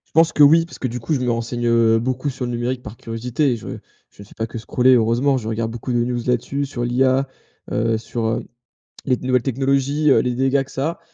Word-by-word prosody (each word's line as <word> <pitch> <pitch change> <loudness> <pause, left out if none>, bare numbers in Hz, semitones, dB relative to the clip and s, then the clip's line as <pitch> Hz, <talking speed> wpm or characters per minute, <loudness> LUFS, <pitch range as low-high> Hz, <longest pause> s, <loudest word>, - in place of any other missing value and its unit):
Je 160 - +7
pense 165 0 +1
que 150 - +5
oui, 160 +3 +6
parce 170 - -12
que, 130 - -2
du 120 +1 -5
coup, 115 +8 -2
je 135 - -1
me 125 -1 +1
renseigne 115 -1 +2
beaucoup 130 +4 -2
sur 130 -1 -4
le 120 - -3
numérique 120 +1 -2
par 105 +2 -9
curiosité 120 +5 -1
et - - 0
je - - -10 0.4
je - - -16
ne 100 - -12
fais - - -18
pas 115 - -2
que 115 0 -7
scroller, 125 +3 +3
heureusement, 125 +4 +2
je 110 - -7
regarde 115 0 -2
beaucoup 120 +2 -5
de 120 - +1
news 120 0 -2
là-dessus, 135 +3 -1
sur 120 -3 -3
l'IA, 130 +2 +2 0.4
heu, 115 0 +1
sur, 115 +1 -4
heu, 110 +1 -2 0.6
les 130 - +2
nouvelles 125 -1 0
technologies, 135 +3 +1
heu, - - +5
les 125 -1 -1
dégâts 135 +1 +1
que - - -16
ça 135 +4 -1
a, 170 - -7
125 Hz, 250 wpm, -20 LUFS, 115-135 Hz, 0.6 s, Je